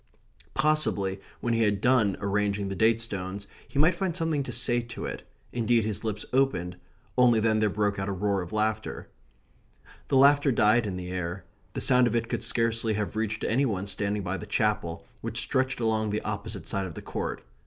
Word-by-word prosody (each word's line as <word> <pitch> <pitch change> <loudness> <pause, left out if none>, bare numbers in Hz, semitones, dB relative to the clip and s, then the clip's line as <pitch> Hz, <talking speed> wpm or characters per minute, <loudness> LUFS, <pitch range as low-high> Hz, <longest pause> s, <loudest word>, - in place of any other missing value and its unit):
Possibly, 135 -10 +1 0.2
when 120 - 0
he 115 - +2
had 105 -2 +2
done 115 -4 +3
arranging 100 0 0
the 95 - -3
date 110 +3 +3
stones, 100 -3 -4 0.2
he - - -8
might 160 +5 +5
find 175 -1 -2
something 165 -4 0
to 130 - -5
say 120 0 +1
to 115 0 -7
it - - -6 0.3
indeed 115 -1 +2
his 110 -1 -2
lips 110 -2 -3
opened 110 -10 +1 0.4
only 120 -3 +6
then 110 0 +2
there 105 -1 +3
broke 100 0 0
out 95 +1 -2
a - - -1
roar 100 0 0
of 90 - -7
laughter. 110 0 -2 1.0
The 135 - +2
laughter 140 +1 +6
died 110 0 +3
in 95 - -3
the 90 0 -5
air. 90 0 -4 0.3
The - - -2
sound 125 -1 +5
of 120 - -1
it 115 0 0
could - - -2
scarcely 115 -1 +1
have 105 0 -3
reached 110 0 -2
any 135 +4 +2
one 100 -4 -2
standing 100 +1 -2
by 95 +1 -2
the 105 - -8
Chapel, 105 -5 -1 0.2
which - - 0
stretched 130 -1 0
along 110 -2 +1
the 105 +1 -1
opposite 100 -3 -4
side 95 +3 -1
of 85 - -9
the - - -8
court. - - -4
110 Hz, 200 wpm, -27 LUFS, 100-120 Hz, 1.0 s, only